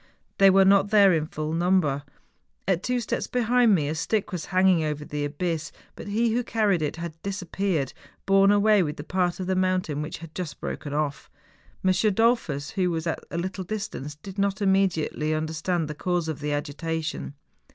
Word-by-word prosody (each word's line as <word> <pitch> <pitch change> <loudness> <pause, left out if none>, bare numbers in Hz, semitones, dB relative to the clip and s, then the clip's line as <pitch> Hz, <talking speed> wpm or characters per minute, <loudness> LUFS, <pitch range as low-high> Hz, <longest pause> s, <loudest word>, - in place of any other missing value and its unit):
They 195 0 +8
were 195 0 +6
not 195 +1 +5
there 200 -3 +6
in 155 -2 0
full 155 0 -4
number. 170 -5 +2 0.7
At 185 -2 +2
two 250 +3 0
steps 230 - -2
behind 245 -2 +3
me 150 -5 0
a 150 - -1
stick 200 +7 -1
was 175 -4 -4
hang¬ 185 0 +3
ing 175 -4 +4
over 150 -1 -3
the 150 0 -3
abyss, 155 +2 -2 0.2
but - - -9
he 225 +3 +1
who 245 +1 +1
carried 210 -7 +1
it 150 0 -1
had 165 -1 -7
dis¬ 200 0 -4
appeared, 175 -6 -1 0.3
borne 195 0 +5
away 205 0 +4
with 150 -4 -2
tlie 145 - -8
part 180 -1 0
of 185 - -3
the 190 - 0
moun¬ 185 0 +2
tain 150 -1 -4
which 150 - -5
had 165 -1 -11
just 175 -4 -5
broken 145 - -5
off. 145 -1 -2 0.6
M. 185 - +5
Dollfus, 210 - +1
who 185 -2 0
was 165 -1 -2
at 165 - -2
a - - -4
little 185 +2 -3
distance, 180 -8 -5
did 195 +6 -9
not 195 -1 +1
immediately 190 -6 +1
under¬ 155 +1 -2
stand 165 0 -1
the 150 - -4
cause 175 +1 -1
of 155 -2 -4
the 150 0 -3
agitation. 155 +1 -3
180 Hz, 205 wpm, -25 LUFS, 155-195 Hz, 0.7 s, They